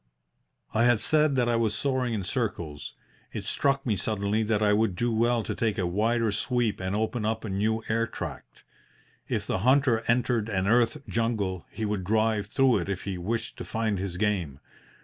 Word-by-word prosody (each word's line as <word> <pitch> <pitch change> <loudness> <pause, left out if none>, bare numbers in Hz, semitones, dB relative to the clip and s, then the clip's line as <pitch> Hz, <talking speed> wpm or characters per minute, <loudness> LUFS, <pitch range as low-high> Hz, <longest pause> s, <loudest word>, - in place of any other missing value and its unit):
"I 115 +2 +3
have 120 -2 +4
said 155 -2 +3
that 125 -2 +2
I 120 - +2
was 110 -2 +1
soaring 130 -2 0
in 100 - -2
circles. 90 - -3 0.4
It - - -5
struck 140 0 +1
me 110 -4 +1
suddenly 105 +1 -1
that 110 -1 +1
I 105 0 +4
would 105 -3 +2
do 120 +6 0
well 115 +1 +2
to - - -3
take 110 -2 -1
a 95 - 0
wider 110 +5 +1
sweep 115 +1 0
and 95 +1 -2
open 110 +2 -1
up 110 +1 -1
a - - -4
new 110 +3 0
air 115 +1 +1
tract. - - -8 0.7
If - - -1
the - - -1
hunter 130 0 +3
entered 120 -2 +1
an 95 -3 0
earth 115 +2 +2
jungle 105 -6 -1
he 110 - -4
would 105 -2 -2
drive 110 +1 +1
through 130 +2 +3
it 85 - -4
if 100 -2 -3
he 95 -3 -4
wished 110 +5 -3
to - - -5
find 110 -3 -1
his 95 -2 -4
game. 90 -9 -1
110 Hz, 195 wpm, -27 LUFS, 100-120 Hz, 0.7 s, have